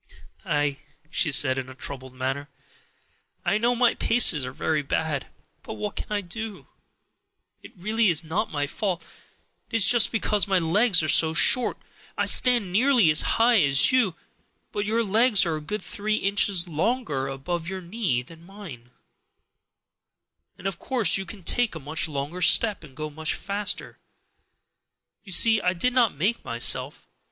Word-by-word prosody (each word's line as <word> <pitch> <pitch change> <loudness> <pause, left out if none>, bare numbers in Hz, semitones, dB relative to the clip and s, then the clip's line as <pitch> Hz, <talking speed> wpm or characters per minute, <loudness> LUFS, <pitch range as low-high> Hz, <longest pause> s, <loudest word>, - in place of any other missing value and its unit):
"Ah," 145 -1 0 0.4
she 170 - +1
said 135 -1 +3
in 130 0 -7
a 130 - -11
troubled 130 -1 -8
manner, 135 +3 -4 1.0
"I 200 +4 +1
know 240 +2 +1
my 240 -1 +3
paces 220 - +2
are 130 - -5
very 155 +3 -1
bad, 145 0 -3 0.3
but - - -8
what 210 -1 -5
can - - -6
I 210 -1 -1
do? 200 - -7 1.0
It - - -15
really 215 +5 0
is 165 -1 +3
not 165 +7 -3
my 145 -1 -2
fault; 185 +4 -4 0.6
it - - -5
is 225 -4 +5
just 240 -2 +4
because 210 -2 0
my 195 -1 +2
legs 180 +2 +2
are - - -1
so 160 +1 +3
short. 250 +9 +4 0.4
I - - 0
stand 240 -7 +4
nearly 240 - +4
as 155 - +5 0.2
high 230 -2 +4
as 140 -1 +4
you, 235 -10 +1 0.6
but 205 0 -3
your 230 +2 0
legs 215 0 +3
are 165 -2 -1
a - - -8
good 210 +8 -5
three 215 +1 -3
inches 195 -3 +1
longer 165 - -2
above 160 +6 -5
your 190 0 -6
knee 175 - -2
than 165 +5 -16
mine, 170 - -12 1.7
and 185 - -15
of 195 -3 -3
course 235 -9 +2
you 195 -1 -3
can 190 +1 -10
take 240 +3 0
a - - -6
much 150 +3 -2
longer 145 +5 -5
step 205 +2 +3
and 135 -3 -15
go 155 0 -5
much 160 +2 -2
faster. 200 +1 -3 1.2
You 195 - -12
see 220 +3 +4
I 180 -1 +1
did 245 +8 0
not 240 - +2
make 200 +11 -1
myself. 125 +3 -2
180 Hz, 165 wpm, -24 LUFS, 150-215 Hz, 1.7 s, is